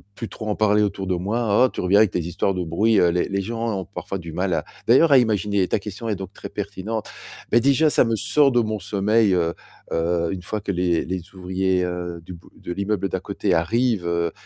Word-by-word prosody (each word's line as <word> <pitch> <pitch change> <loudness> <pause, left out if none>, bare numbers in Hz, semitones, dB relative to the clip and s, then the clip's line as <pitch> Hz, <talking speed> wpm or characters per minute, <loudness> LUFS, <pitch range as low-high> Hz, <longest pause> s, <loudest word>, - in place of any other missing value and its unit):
plus 115 - -6
trop 110 - -8
en 105 - 0
parler 105 0 +3
autour 100 -2 -2
de 90 - +1
moi: 105 +5 +2
«Oh, - - +1
tu - - -5
reviens 95 +3 +4
avec 110 -5 +3
les 85 - -1
histoires 90 +3 0
de 90 -1 -2
bruit». 100 +6 +2
Heu, 85 - +4
les 90 +1 0
les 100 0 -1
gens 115 0 -3
ont 95 - -6
parfois 95 0 -6
du 85 -3 -8
mal 90 +2 -1
à 80 -2 -1 0.2
d'ailleurs 135 +7 +5
à 140 - +8
imaginer 105 -5 +1
ta 105 - 0
question 105 +3 -7
est 105 - 0
donc 95 -1 -7
très - - -9
pertinente, 105 +2 -5 0.4
mais 120 - +6
déjà, 140 +5 +3
ça - - +4
me 115 -1 0
sort 140 +5 +3
de 120 -1 +3
mon 110 -1 -2
sommeil, 100 +2 +2
heu 85 -2 +1 0.4
heu, 85 0 0
une 95 - -6
fois 105 +2 -4
que 100 - -3
les 90 -2 0
les 90 +1 -3
ouvriers, 95 0 0
heu, 90 -1 -5
du 90 - -9
bout 85 - -14
de - - -7
l'immeuble 100 0 -1
d'à 95 - -2
côté 100 0 -2
arrivent, 105 +4 +1
heu, 85 -1 0
100 Hz, 240 wpm, -22 LUFS, 90-110 Hz, 0.4 s, à